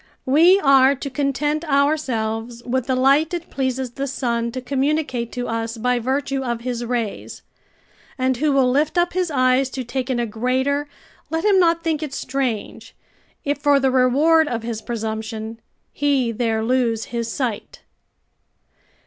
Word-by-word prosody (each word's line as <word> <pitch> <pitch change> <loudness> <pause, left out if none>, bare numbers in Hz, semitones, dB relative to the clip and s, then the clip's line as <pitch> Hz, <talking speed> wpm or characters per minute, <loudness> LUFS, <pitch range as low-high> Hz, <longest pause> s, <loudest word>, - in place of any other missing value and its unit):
We 335 +8 +5
are 275 -1 +5
to 280 +1 -6
content 295 +3 -1
ourselves 240 -6 0
with 255 0 -1
the 260 - +1
light 280 +6 +3
it 340 0 -7
pleases 260 -2 -2
the 275 +3 -4
sun 235 -3 -2
to 255 - -3
communicate 265 -2 -1
to 245 0 -3
us, 230 0 -3
by 250 +2 +1
virtue 270 +2 -1
of 235 -2 -3
his 240 -1 -3
rays; 235 -3 -4 0.7
and 260 0 +1
who 300 +3 +1
will 265 -2 +3
lift 300 +6 +1
up 350 0 +2
his 365 -1 0
eyes 255 -1 +2
to 260 0 -5
take 255 +2 -4
in 250 -2 0
a 240 - 0
greater, 260 +6 -1 0.4
let 325 +3 -2
him 400 -2 +5
not 335 -1 +3
think 320 -2 -1
it 290 -3 -5
strange, 255 -5 -3 0.5
if 285 0 -1
for 285 -1 +4
the 265 -1 +2
reward 290 +6 +4
of 235 -5 -3
his 225 -2 -4
presumption, 220 -1 -5 0.3
he 275 -5 +1
there 225 -1 -1
lose 230 -2 +1
his 230 -1 -2
sight. 240 -6 -4
260 Hz, 160 wpm, -21 LUFS, 235-285 Hz, 0.7 s, We